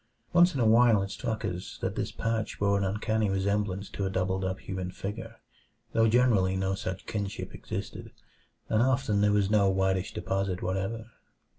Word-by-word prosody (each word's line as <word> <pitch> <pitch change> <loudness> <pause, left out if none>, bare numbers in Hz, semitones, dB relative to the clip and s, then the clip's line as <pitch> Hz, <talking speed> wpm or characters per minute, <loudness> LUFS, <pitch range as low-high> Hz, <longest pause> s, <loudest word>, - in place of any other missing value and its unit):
Once 175 -1 +5
in - - -1
a 120 - +3
while 115 -2 +5
it 100 - -5
struck 110 +1 -3
us 90 -3 -5
that - - -2
this - - -2
patch 115 -1 -2
bore 100 0 +2
an 100 - +1
uncanny 105 +2 0
resemblance 100 0 -1
to 100 - -5
a 95 - 0
doubled 95 0 -1
up 95 0 -1
human 95 -1 -4
figure, 100 +4 -6 0.6
though 115 0 +4
generally 110 -5 +3
no 95 0 0
such 95 -1 -5
kinship 100 -3 -4
existed, - - -6 0.6
and 110 - +2
often 130 -5 +2
there 105 0 +4
was 105 -1 +2
no 100 -2 +4
whitish 95 -1 +1
deposit 95 0 -2
whatever. 95 +5 -2
100 Hz, 175 wpm, -29 LUFS, 95-110 Hz, 0.6 s, Once